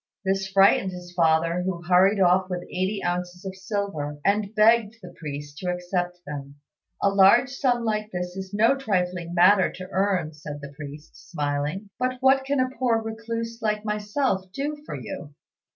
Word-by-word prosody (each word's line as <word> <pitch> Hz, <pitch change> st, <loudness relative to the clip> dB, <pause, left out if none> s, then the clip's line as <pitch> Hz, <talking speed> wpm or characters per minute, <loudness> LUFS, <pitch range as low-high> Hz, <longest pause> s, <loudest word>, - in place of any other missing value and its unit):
This 195 Hz, 0 st, 0 dB
frightened 195 Hz, 0 st, +4 dB
his 180 Hz, 0 st, -9 dB
father, 165 Hz, +1 st, +2 dB
who 180 Hz, -1 st, -3 dB
hurried 185 Hz, +3 st, +4 dB
off 185 Hz, 0 st, +4 dB
with 180 Hz, -1 st, -3 dB
eighty 190 Hz, +4 st, -2 dB
ounces 180 Hz, +1 st, -3 dB
of 190 Hz, 0 st, -5 dB
silver, 190 Hz, -8 st, -3 dB
and 205 Hz, +1 st, +1 dB
begged 220 Hz, 0 st, +4 dB
the -, -, -11 dB
priest 145 Hz, -1 st, -7 dB
to 180 Hz, -, -3 dB
accept 180 Hz, 0 st, -2 dB
them. 140 Hz, -1 st, -7 dB, 0.5 s
"A 200 Hz, -, +5 dB
large 200 Hz, +7 st, +5 dB
sum 250 Hz, -3 st, 0 dB
like 215 Hz, -1 st, -1 dB
this 180 Hz, 0 st, -4 dB
is 190 Hz, 0 st, -6 dB
no 220 Hz, +6 st, +4 dB
trifling 180 Hz, -8 st, -2 dB
matter 185 Hz, +2 st, +5 dB
to 185 Hz, +1 st, -8 dB
earn," 190 Hz, -5 st, 0 dB
said 150 Hz, -1 st, -8 dB
the 140 Hz, 0 st, -9 dB
priest, 150 Hz, +1 st, -11 dB
smiling; 150 Hz, +5 st, -2 dB
"but 255 Hz, 0 st, 0 dB
what 265 Hz, +1 st, +4 dB
can 280 Hz, 0 st, 0 dB
a 255 Hz, 0 st, +1 dB
poor 240 Hz, -3 st, +2 dB
recluse 230 Hz, +1 st, -5 dB
like 210 Hz, -1 st, -1 dB
myself 210 Hz, -2 st, -1 dB
do 285 Hz, +8 st, -3 dB
for -, -, -5 dB
you?" 155 Hz, -, -8 dB
190 Hz, 170 wpm, -25 LUFS, 175-215 Hz, 0.5 s, A